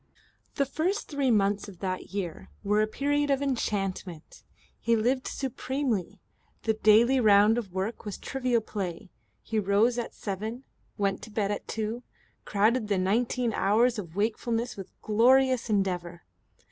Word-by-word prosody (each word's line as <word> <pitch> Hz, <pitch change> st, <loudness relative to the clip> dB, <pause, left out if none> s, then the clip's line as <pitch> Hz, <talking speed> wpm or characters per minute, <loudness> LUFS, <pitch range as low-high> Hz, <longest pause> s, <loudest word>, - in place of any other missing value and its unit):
The 280 Hz, -, +2 dB
first 335 Hz, +9 st, -2 dB
three 280 Hz, -3 st, 0 dB
months 205 Hz, -2 st, +2 dB
of 190 Hz, -, -12 dB
that 185 Hz, 0 st, -3 dB
year 190 Hz, -4 st, -5 dB
were 210 Hz, +1 st, +2 dB
a 215 Hz, -, +2 dB
period 290 Hz, +5 st, 0 dB
of 275 Hz, -1 st, +2 dB
enchantment. 195 Hz, -, -3 dB, 0.4 s
He 230 Hz, 0 st, +2 dB
lived 250 Hz, +4 st, 0 dB
supremely. 250 Hz, -7 st, -2 dB, 0.4 s
The 220 Hz, -, +2 dB
daily 220 Hz, +4 st, +5 dB
round 215 Hz, 0 st, +5 dB
of 200 Hz, -6 st, -7 dB
work 190 Hz, +5 st, -3 dB
was 205 Hz, -3 st, -5 dB
trivial 250 Hz, -3 st, 0 dB
play. 185 Hz, -5 st, -5 dB, 0.3 s
He 220 Hz, -1 st, -1 dB
rose 210 Hz, +5 st, +2 dB
at 235 Hz, -, -5 dB
seven, 215 Hz, +5 st, -5 dB, 0.3 s
went 195 Hz, -1 st, 0 dB
to -, -, -9 dB
bed 210 Hz, -1 st, -1 dB
at 205 Hz, -, -4 dB
two, 220 Hz, +2 st, -3 dB, 0.4 s
crowded 215 Hz, +3 st, +2 dB
the 200 Hz, -2 st, +1 dB
nineteen 230 Hz, +5 st, +1 dB
hours 225 Hz, +5 st, +2 dB
of 170 Hz, -4 st, -8 dB
wakefulness 230 Hz, +3 st, -1 dB
with 195 Hz, -2 st, -9 dB
glorious 255 Hz, +3 st, +4 dB
endeavour. 180 Hz, -4 st, -1 dB
215 Hz, 145 wpm, -28 LUFS, 200-245 Hz, 0.4 s, daily